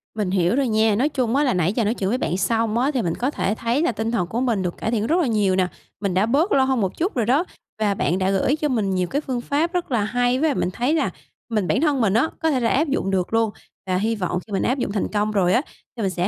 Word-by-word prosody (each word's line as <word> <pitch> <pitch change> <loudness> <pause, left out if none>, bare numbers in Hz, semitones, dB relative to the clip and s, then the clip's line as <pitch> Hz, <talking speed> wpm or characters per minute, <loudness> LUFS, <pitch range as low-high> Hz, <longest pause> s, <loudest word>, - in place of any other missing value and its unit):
Mình 205 -4 -1
hiểu 185 +3 +2
rồi 275 -2 +1
nha, 220 -1 +2
nói 270 +7 +2
chung 255 -4 -1
á 290 - +3
là 260 - +2
nãy 180 +2 +1
giờ 235 - 0
nói 220 - +1
chuyện 195 -5 -2
với 250 - +1
bạn 180 -7 -1
xong 225 +3 0
á, 265 +5 +2
thì 255 - +1
mình 170 -5 -1
có 260 +4 -1
thể 210 -6 -1
thấy 235 +7 0
là 335 - +2
tinh 225 +2 -3
thần 180 -7 0
của 230 +7 -2
mình 230 -7 +1
được 180 -1 -3
cải 225 - -2
thiện 220 -1 0
rất 335 +4 +2
là 300 - +1
nhiều 205 -5 +2
nè, 185 -1 +2 0.3
mình 200 -3 -1
đã 190 +3 +3
bớt 295 - +1
lo 270 - +4
hơn 265 -3 +1
một 190 - -2
chút 360 +5 -1
rồi 235 -4 +1
đó 270 +9 +3 0.4
và 205 -2 +2
bạn 185 -2 0
đã 190 +1 +1
gửi 225 +9 +2
cho 305 -1 -1
mình 210 -8 0
nhiều 180 -1 0
cái 285 - -1
phương 255 -4 -3
pháp 315 +7 -1
rất 350 -6 -2
là 225 -4 +2
hay. 245 +3 +1
Với 315 +2 +2
lại 280 - -1
mình - - 0
thấy 255 +6 0
là 325 - +1 0.4
mình 210 -5 0
bản 255 - +1
thân 290 -5 +2
mình 205 -4 +2
á, 250 +9 +2
có 320 - +2
thể 260 - +1
là 230 - +1
áp 300 +4 +2
dụng 195 -8 -1
được 185 +2 -1
luôn, 225 -1 +3 0.4
và 185 0 +1
hy 225 +4 0
vọng 180 -3 -2
khi 205 - -9
mình 195 - 0
áp 255 - +1
dụng 245 - -2
thành 205 - -1
công 210 0 -1
rồi 185 -3 +2
á, 245 - +4 0.4
thì - - -3
mình 195 - +1
sẽ 180 0 -1
225 Hz, 315 wpm, -22 LUFS, 195-265 Hz, 0.4 s, lo